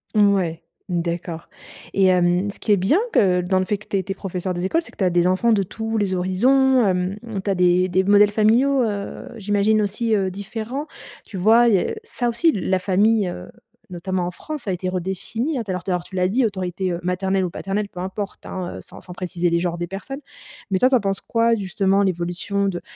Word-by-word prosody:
Ouais, 195 -6 +2 0.3
d'accord 170 -1 -3 0.5
et 195 -1 +3
hem, 180 +2 +3
ce - - -12
qui 210 - +2
est - - +6
bien, 195 - +3
que 180 -3 +4
dans 185 +1 +1
le 185 - 0
fait 205 +1 -1
que 210 - -17
tu 200 - -1
es 190 - -1
tu 195 - -6
es - - -2
professeur 185 -1 -4
des 175 +1 -3
écoles, 330 - +1
c'est - - -10
que - - -23
tu - - -1
as - - +4
des 175 0 +2
enfants 190 +6 +3
de 200 -2 +2
tous 220 +4 -4
les 200 -3 0
horizons, 250 +7 +3
hem, 185 0 0 0.3
tu 200 - -2
as 195 - +2
des 180 0 +3
des 185 +1 +1
modèles 205 +1 +5
familiaux, 245 +6 +3
heu, 205 -3 -4
j'imagine 205 +1 +2
aussi, 215 +3 -1
heu, 195 -2 +1
différents. 225 +9 -5 0.4
Tu 195 - -8
vois? 230 +5 +5
Il 215 - +4
y 185 - +4
a - - -2
ça 440 - -2
aussi 240 +8 +3
la 190 - 0
famille, 205 +2 +2
heu, - - -8 0.4
notamment 185 0 -2
en 180 - -3
France, 305 - -7
ça - - -5
a 185 - +1
été 185 +1 -4
redéfinie, 190 - -2
heu, - - -2
d'ailleurs, 185 -2 -3
tout-à-l'heure, 180 -2 -1
tu 190 - -11
l'as 180 0 +2
dit 245 +4 +2
autorité, 185 -2 -2
heu, 170 - -3
maternelle 190 +1 0
ou 180 - -1
paternelle 200 +3 -3
peu 180 - -10
importe 195 +2 -5
hein, 185 -2 -5
heu, - - -8
sans - - -12
sans 180 - -12
préciser 175 -1 -1
les 170 - +1
genres 175 -1 -2
des 175 0 -3
personnes. 265 - -7 0.5
Mais 190 - +2
toi, 255 - +5
tu 265 - +3
en 245 - +4
penses 195 -1 -1
quoi 230 0 +2
justement 195 0 +1
l'évolution 185 +2 -1
de 175 -2 -4
195 Hz, 235 wpm, -22 LUFS, 180-215 Hz, 0.5 s, est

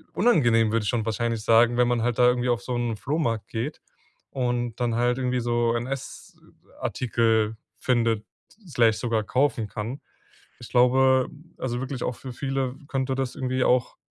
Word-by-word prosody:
unangenehm, 120 - +3
würde 115 - +1
ich - - -2
schon 120 -3 0
wahrscheinlich 115 0 -1
sagen, 115 +2 +4
wenn 125 0 +3
man 120 -2 +1
halt 120 0 -1
da 125 - +6
irgendwie 125 0 +2
auf 120 -1 +1
so 125 - -4
’n 120 -2 -1
Flohmarkt 120 -4 -2
geht 120 +7 -4 0.5
und 120 -2 -1
dann 120 -2 0
halt 120 +1 +1
irgendwie 125 -1 0
so 120 0 +1
NS-Artikel 115 -3 -2 0.2
findet, 115 -4 +1 0.4
Slash, 115 -7 +3
sogar 115 -3 0
kaufen 130 -3 0
kann. 110 +7 -5 0.6
Ich 120 - -10
glaube, 130 +1 +4 0.3
also, 120 -2 -3
wirklich 130 -1 -5
auch 125 - -2
für 130 - -8
viele 135 0 -2
könnte 135 -1 -1
das 130 -1 -2
irgendwie 130 0 -1
auch 125 -1 +2
120 Hz, 160 wpm, -25 LUFS, 115-130 Hz, 0.6 s, da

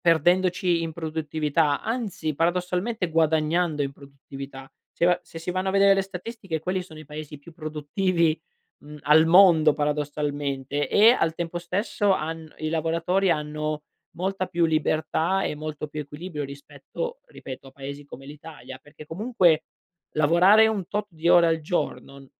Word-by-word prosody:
perdendoci 175 +1 +2
in 165 - -3
produttività, 155 -2 -1
anzi 215 -10 -3
paradossalmente 180 +5 -1
guadagnando 160 0 +1
in 140 -1 -3
produttività. 140 -1 -11 0.2
Se - - -1
va 175 0 +4
se 165 - -10
si 165 +2 -4
vanno 185 +1 -1
a - - +2
vedere 195 0 +5
le 195 - +1
statistiche 195 -1 -6
quelli 185 +2 -2
sono 160 -4 -13
i 155 - -10
paesi 150 0 -8
più 155 +4 -15
produttivi, 160 +1 -1 0.4
mhmm, 150 +1 -12
al 155 +2 +5
mondo 165 -3 +6
paradossalmente 145 -2 -2
e 220 +3 +6
al 165 -10 +1
tempo 170 0 -4
stesso 200 +3 0
han 160 -2 -4
i 155 - -3
lavoratori 165 +4 +1
hanno 150 -1 -2 0.3
molta 190 +1 -2
più 170 -1 0
libertà 160 +3 +1
e - - -2
molto 150 0 -5
più 150 0 -5
equilibrio 150 +1 -6
rispetto, 305 - -7
ripeto, 130 +1 -10
a - - -14
paesi 140 +1 -8
come 135 -1 -12
l'Italia. 145 -3 -10
Perché 145 +1 -14
comunque 175 -4 +2 0.5
lavorare 175 +8 +6
un 210 -5 -1
tot 210 0 -2
di 165 0 -2
ore 175 -1 +7
al 165 -1 +1
giorno 140 -4 -4
160 Hz, 155 wpm, -25 LUFS, 150-180 Hz, 0.5 s, ore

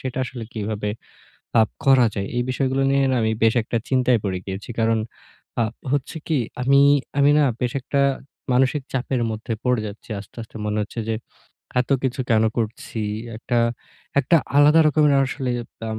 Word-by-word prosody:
সেটা 130 -1 -4
আসলে 120 -2 -7
কীভাবে 105 -1 -3 0.7
আপ 110 - +3 0.2
করা 130 -3 +6
যায়। 100 -1 -2
এই 120 - +2
বিষয়গুলো 135 +1 0
নিয়ে 140 0 +3
না 130 - +1
আমি 110 0 +1
বেশ 115 0 +5
একটা 115 - -3
চিন্তায় 125 -2 +3
পড়ে 95 -2 -1
গিয়েছি। 95 +4 -6
কারণ 115 0 +2 0.6
আ - - +4 0.3
হচ্ছে 145 +3 -1
কী, 155 -3 +1 0.2
আমি, 140 +2 +5 0.4
আমি 140 +1 +5
না 150 - +5 0.2
বেশ 125 -1 0
একটা 140 +2 0 0.5
মানসিক 135 +3 +2
চাপের 130 -1 -1
মধ্যে 110 +1 -4
পড়ে 125 -2 +2
যাচ্ছি। 105 +3 -10
আস্তে, 100 - -15
আস্তে 110 - -12
মনে 105 0 -1
হচ্ছে 110 +3 -5
যে 115 - +1 0.7
এতকিছু 130 0 0
কেন 110 -1 +4
করছি? 115 0 -3 0.4
একটা, 120 +2 -1 0.6
একটা 170 - +3 0.2
আলাদা 150 +3 +7
রকমের 150 -1 +4
আসলে 130 -1 -3 0.4
আম 110 - -3
125 Hz, 165 wpm, -22 LUFS, 110-135 Hz, 0.7 s, আলাদা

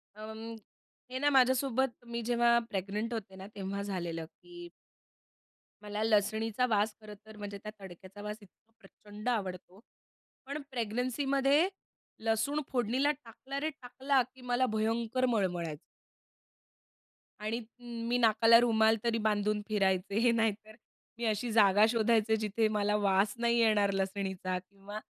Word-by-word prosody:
अं, 220 +1 -8 0.6
हे 260 - -3
ना 290 +2 +3
माझ्यासोबत 260 -1 +3
मी 235 0 -4
जेव्हा 235 0 +4
प्रेग्नंट 205 +4 -3
होते 200 -4 -6
ना 190 +1 -9
तेव्हा 200 0 -4
झालेलं 170 -5 -4
की 350 - -13 1.2
मला 210 +1 -3
लसणीचा 220 +2 +1
वास 210 0 +1
खरंतर 215 0 -12
म्हणजे 205 -1 -6
त्या 215 - -6
तडक्याचा 190 +1 -11
वास 210 +1 -5
इतका 205 +3 -22
प्रचंड 210 +3 -8
आवडतो. 190 -4 -3 0.7
पण 280 +3 -5
प्रेग्नन्सीमध्ये 270 - +1 0.6
लसूण 225 +7 +1
फोडणीला 255 +3 +2
टाकला 270 0 -7
रे 310 +2 -1
टाकला, 265 0 0
की 260 - -15
मला 250 +1 +1
भयंकर 225 +3 0
मळमळायचं. 180 -10 -1 1.6
आणि 215 +2 -2 0.5
मी 245 +1 +2
नाकाला 230 0 +6
रुमाल 220 -2 +4
तरी 230 -1 +1
बांधून 210 0 0
फिरायचे 200 +3 +2
नाहीतर 215 -1 -1 0.4
मी 235 - -3
अशी 220 +2 -1
जागा 205 -1 +6
शोधायचे, 225 -1 +3
जिथे 215 +1 0
मला 210 -1 +1
वास 200 0 +2
नाही 235 0 +2
येणार 210 -3 +4
लसणीचा 190 -1 -2
किंवा 195 +3 -10
220 Hz, 125 wpm, -31 LUFS, 205-240 Hz, 1.6 s, नाकाला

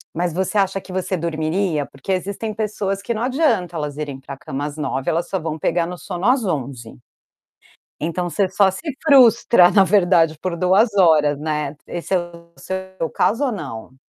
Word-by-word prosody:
Mas 175 +1 0
você 190 +4 -1
acha 195 0 +1
que 190 - -13
você 185 0 -2
dormiria? 160 0 -1
Porque 135 +8 -7
existem 200 +4 -2
pessoas 205 -2 -2
que 235 +4 -2
não 220 - -2
adianta 245 - +1
elas 150 -2 -4
irem 145 -3 -5
para 135 +1 -9
cama 135 +2 -5
às 150 0 -6
21h, 135 -3 -2
elas 170 +2 0
só 190 - -2
vão 160 -1 -4
pegar 170 +2 0
no 180 - -6
sono 175 +3 -5
às 250 -1 +3
23h. 135 -8 -4 1.1
Então 170 +3 -2
você 195 +2 0
só 190 +1 +3
se 190 - -7 0.3
frustra, 235 - +6
na 195 -2 +5
verdade, 175 -5 +3
por 180 -2 -3
2h 195 +5 +3
horas, 155 -6 +4
né, 150 -1 -3
Esse 175 +2 -6
é - - +4
o 170 -1 -9
seu 190 -2 -5
caso 235 +7 +1
ou 260 - 0
não? 130 - -7
175 Hz, 190 wpm, -20 LUFS, 155-195 Hz, 1.1 s, frustra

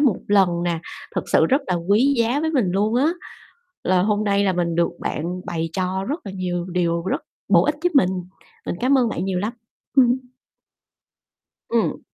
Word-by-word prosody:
một 260 -10 +3
lần 195 -3 +5 0.2
nè, 170 -2 0 0.4
thực - - -1
sự - - +5
rất 275 +3 +2
là 180 - 0
quý 205 +11 +2
giá 240 +5 +2
với 320 - 0
mình 245 - +1
luôn 210 +4 +1
á. 285 +7 +3 0.7
Là 180 0 +3
hôm 210 +1 +1
nay 200 0 +2
là 190 - +2
mình 170 -2 -1
được 170 0 +2
bạn 175 +4 -3
bày 165 -1 -3
cho 185 +1 -1
rất 300 +5 -2
là 195 - -5
nhiều 180 -2 -3
điều 170 -1 0
rất 190 - -1 0.3
bổ 175 -3 +5
ích 295 - +1
giúp 355 - +2
mình, 225 -10 +5 0.6
mình - - -2
cảm 265 +2 +4
ơn 240 -2 +2
bạn 180 -3 -3
nhiều 190 -2 -1
lắm. 210 +5 -2 0.4
Ừm. 250 -1 +5 1.5
Ừm. 230 -1 0
195 Hz, 195 wpm, -22 LUFS, 180-240 Hz, 1.5 s, lần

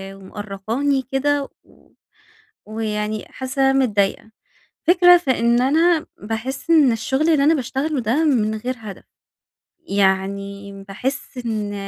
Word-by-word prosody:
ومأرقاني 210 +8 -3
كده 280 +1 0
و - - -25 0.8
ويعني 215 -1 -3
حاسة 260 +1 -4
إن - - 0
أنا 270 -1 +4
متضايقة. 205 0 -1 0.6
الفكرة 355 0 +7
في 315 -6 -1
إن 235 +1 +3
أنا 320 +4 +3
باحس 225 +8 -5
إن 305 -6 +5
الشغل 235 +5 -1
اللي 300 -4 +3
أنا 310 +3 +5
باشتغله 275 +2 -2
ده 240 +9 +1
من 220 -7 +1
غير 245 +4 -4
هدف، 210 -3 -9 0.8
يعني 200 - -1 0.2
باحس 255 +7 -5
إن 215 -3 -3
240 Hz, 125 wpm, -20 LUFS, 210-280 Hz, 0.8 s, الفكرة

